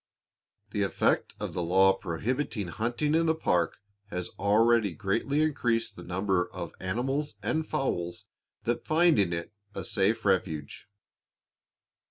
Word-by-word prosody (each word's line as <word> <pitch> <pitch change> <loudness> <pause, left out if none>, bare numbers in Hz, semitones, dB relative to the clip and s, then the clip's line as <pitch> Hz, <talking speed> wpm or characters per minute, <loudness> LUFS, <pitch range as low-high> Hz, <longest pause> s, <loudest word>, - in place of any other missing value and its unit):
The - - -1
effect - - +1
of - - -4
the 90 - -2
law 95 +3 +5
prohibiting 105 - -2
hunting 120 - -1
in 165 +1 +3
the 160 - +3
park 90 - +1 0.3
has 90 -3 -4
already 110 0 +4
greatly 115 - 0
increased 120 -7 0
the - - -10
numbers 90 0 0
of - - -6
animals 125 +7 -2
and 155 +8 0
fowls 105 -5 -2 0.4
that 120 +1 -2
find 165 -4 +4
in 95 -4 +2
it 85 +3 -4 0.2
a - - -4
safe 110 +3 +1
refuge. 85 -7 -1
105 Hz, 135 wpm, -29 LUFS, 90-130 Hz, 0.4 s, law